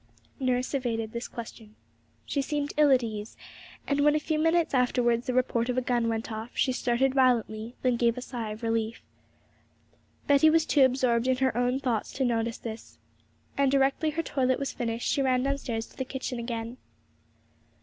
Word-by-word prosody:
Nurse 255 0 0
evaded 230 -5 -2
this 235 0 -4
question; 220 -2 -10 0.5
she 280 - -1
seemed 290 +1 -2
ill 300 -1 +5
at 260 -2 +4
ease; 215 -2 -6 0.5
and 280 0 0
when 295 +1 +4
a - - +2
few 305 0 -1
minutes 325 0 +2
afterwards 245 -2 +2
the 255 - 0
report 245 -1 +1
of 250 - -1
a - - +3
gun 240 -2 0
went 225 0 -3
off, 220 +2 -5
she 260 - +2
started 255 +1 +1
violently, 240 -3 +1
then 250 -2 +2
gave 235 0 +2
a - - -4
sigh 235 -5 -5
of 215 +2 -8
relief. 225 0 -1 1.2
Betty 285 +2 +5
was 320 0 +3
too 285 - +4
absorbed 250 -2 +2
in 260 -1 +2
her 260 -3 +1
own 245 +2 +1
thoughts 245 -6 -1
to 265 - 0
notice 230 0 0
this; 225 -1 -8 0.6
and, 280 -1 +2
directly 275 +3 +2
her 325 +2 -2
toilet 260 -4 +1
was 275 - -3
finished, 230 -1 -3
she 280 - +1
ran 255 -1 +2
downstairs 260 -5 -2
to - - -20
the 260 - -3
kitchen 260 -1 -5
again. 230 0 -5
250 Hz, 185 wpm, -28 LUFS, 230-270 Hz, 1.2 s, ill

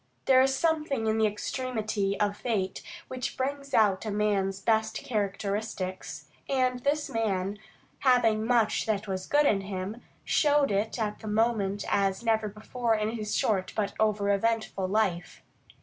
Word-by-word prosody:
There 260 -1 +6
is 265 0 +3
something 305 -7 0
in 220 0 +1
the 220 - +4
extremity 215 -2 -2
of 205 -1 +1
fate 205 -5 -2 0.3
which 255 0 -4
brings 275 +1 -3
out 205 -4 +3
a 220 - -3
man's 200 -2 0
best 220 +2 +1
characteristics, 200 -3 -3 0.2
and 255 -2 +1
this 290 +4 0
man, 205 -3 -1 0.4
having 230 -5 +3
much 230 -2 +2
that 210 -1 -1
was 185 -1 -4
good 295 0 +3
in 200 -7 +3
him, 195 +4 -5 0.2
showed 290 -3 +3
it 205 +4 0
at 215 -2 -2
that 220 - -9
moment 210 -2 +1
as 195 +1 +1
never 220 -2 +1
before 225 +3 -1
in 215 0 -1
his 215 -2 -2
short 195 -4 0
but 210 -2 -1
over 210 -2 +2
eventful 220 -2 0
life. 190 -4 -1
215 Hz, 150 wpm, -28 LUFS, 200-240 Hz, 0.4 s, There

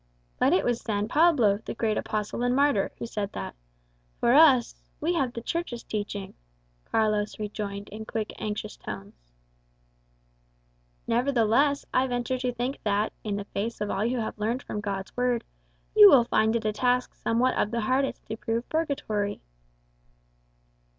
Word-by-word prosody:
'" - - -39
"But - - +4
it 190 - +3
was 240 -1 0
San 205 -2 -1
Pablo, 260 -10 +4
the - - -6
great 220 -1 0
apostle 215 +2 -3
and 245 +1 +2
martyr, 280 -7 +2
who - - -5
said 210 -3 -4
that. - - -5 0.7
For 235 - +3
us, 275 -5 +6 0.3
we 330 +4 0
have 270 -7 0
the 235 -1 -7
Church's 335 -8 -3
teaching," 205 -2 -4 0.5
Carlos 215 -1 0
rejoined 205 -1 -5
in 220 +2 -8
quick, 220 -1 -4
anxious 215 -1 -4
tones. 100 -13 -9 1.7
"Nevertheless, 250 +3 +2
I 260 +1 +3
venture 245 +1 -2
to 250 0 -1
think 245 +3 -3
that, 210 +1 0
in 210 -2 -2
the 200 0 -4
face 215 +3 -4
of 210 0 -2
all 200 - 0
you 245 +3 0
have 220 -2 -4
learned 230 +5 -1
from 210 - -4
God's 195 -2 -4
Word, 245 -2 +1 0.5
you 420 -1 +10
will 265 -7 +7
find 220 -1 +2
it 230 -1 -1
a 215 - +1
task 250 +3 +1
somewhat 245 +3 +1
of - - +1
the 235 +1 -1
hardest 260 +5 0
to 220 - -5
prove 230 +1 -2
purgatory." 220 -10 -2
225 Hz, 165 wpm, -27 LUFS, 210-250 Hz, 1.7 s, you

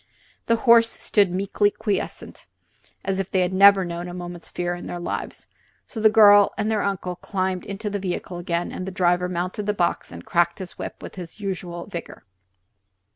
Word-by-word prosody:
The 230 - +4
horses 230 0 +4
stood 205 -3 +3
meekly 200 +2 +1
quiescent, 205 0 -4 0.6
as 195 0 -1
if 195 - -2
they 190 - +1
had 180 +1 0
never 195 0 +6
known 175 0 -5
a 175 - -7
moment's 175 -1 -8
fear 175 0 -2
in 175 - -7
their 175 - -5
lives. 175 - -5 0.4
So 225 - -7
the 220 - +7
girls 205 -2 +7
and 215 +1 0
their 215 -2 +1
uncle 185 -2 -2
climbed 185 -2 -2
into 200 +2 -5
the 205 0 -2
vehicle 180 -1 -4
again 175 0 -2
and 185 - -6
the - - -4
driver 180 -1 +1
mounted 180 +3 -3
the 210 - 0
box 175 -3 -1
and - - -10
cracked 170 0 +1
his 185 -2 -7
whip - - -7
with - - -9
his 175 +2 -9
usual 180 -4 -5
vigor. 170 - -8
185 Hz, 190 wpm, -23 LUFS, 175-205 Hz, 0.6 s, the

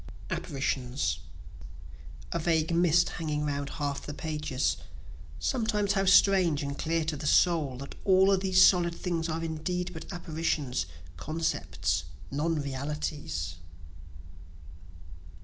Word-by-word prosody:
Apparitions 130 - -1 1.1
A 170 - -1
vague 160 0 +1
mist 175 0 +4
hanging 150 -2 -2
'round 140 -1 -2
half 145 -2 -3
the 145 - -6
pages: 150 -4 -1 0.6
(Sometimes 220 -5 0
how 195 -1 +1
strange 185 -5 +5
and 140 0 -3
clear 165 +1 -1
to 155 -1 -1
the 150 +1 -4
soul, 155 -6 +3
That 140 +2 -8
all 190 0 +5
these 185 -1 +4
solid 170 -2 +4
things 170 -2 -2
are 165 +1 -2
indeed 175 +3 -2
but 160 - -8
apparitions, 155 - -2 0.3
concepts, 80 - -1 0.3
non 155 +3 0
realities.) 135 - -4
160 Hz, 115 wpm, -29 LUFS, 140-175 Hz, 1.1 s, strange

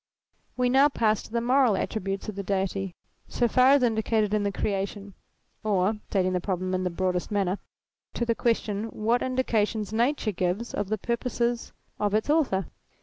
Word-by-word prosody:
"We 250 0 +2
now 270 +3 +5
pass 220 -6 +1
to - - -13
the 235 0 0
moral 250 -3 +3
attributes 195 -1 -3
of 215 - -5
the 200 - -3
Deity, 195 -1 -2 0.3
so 240 - +1
far 255 +2 +4
as 285 -2 +4
indicated 220 -2 +1
in 215 - +2
the 200 0 0
Creation; 200 0 -3 0.5
or 205 0 +1
(stating 185 -2 +1
the 180 - 0
problem 185 0 -2
in 185 0 0
the 180 - 0
broadest 180 0 -1
manner) 200 -2 0 0.6
to 235 - 0
the 230 - +2
question, 220 -3 0
what 225 +2 0
indications 220 -5 0
Nature 235 0 +1
gives 185 +5 -2
of 205 -1 -2
the 215 - 0
purposes 235 +1 -2 0.3
of 205 0 +1
its 220 +7 +1
author. 260 - +2
215 Hz, 175 wpm, -27 LUFS, 195-235 Hz, 0.6 s, now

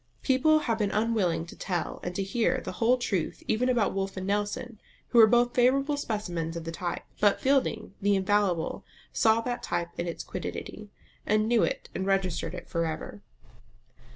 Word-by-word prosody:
People 280 +4 +4
have 230 -5 -1
been 205 -2 +1
unwilling 200 -7 +1
to 170 - -11
tell 175 -3 -3
and 180 0 -5
to 195 - 0
hear 220 +4 +1
the - - -6
whole 240 +2 +2
truth 195 -9 -2
even 250 +4 +1
about 235 -5 +2
Wolfe 195 0 -3
and 185 - -3
Nelson, 205 +3 -2 0.3
who 240 - +4
were 220 - +9
both 240 +2 +3
favourable 275 +4 +3
specimens 175 - -3
of 165 - -5
the 165 - -5
type; 175 +1 -4 0.2
but 205 -1 +3
Fielding 265 -7 +1
the 200 0 +3
infallible 190 -3 +1 0.3
saw 225 0 +4
that 245 +1 -3
type 170 0 -2
in 175 - -1
its 170 - -4
quiddity, 210 -1 -6 0.3
and 215 +1 +2
knew 235 -1 +3
it, - - -1
and 190 - -3
registered 190 -2 0
it - - -8
for 170 -1 -1
ever. 155 -10 -6
205 Hz, 180 wpm, -28 LUFS, 180-235 Hz, 0.3 s, were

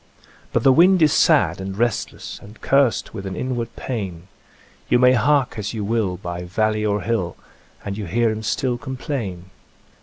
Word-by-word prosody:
But - - 0
the 135 -1 +6
wind 180 +3 +5
is 150 - +4
sad - - +3
and 95 0 -5
restless, 120 +1 -2
And 105 +2 -14
cursed 135 -3 +2
with 100 -3 -6
an 95 - -5
inward 120 0 -3
pain; 95 -8 -5 0.6
You - - +5
may 125 +1 +6
hark 130 0 +2
as 105 +2 -4
you 105 -2 -3
will 105 -4 0
by 85 -1 -5
valley 110 +4 0
or 105 -1 0
hill, 95 -4 -1 0.5
And 100 -1 -3
you 105 -2 -5
hear 115 +4 +1
him 110 0 -4
stiU 120 +2 -1
complain. 115 - -5
110 Hz, 175 wpm, -21 LUFS, 95-125 Hz, 0.6 s, the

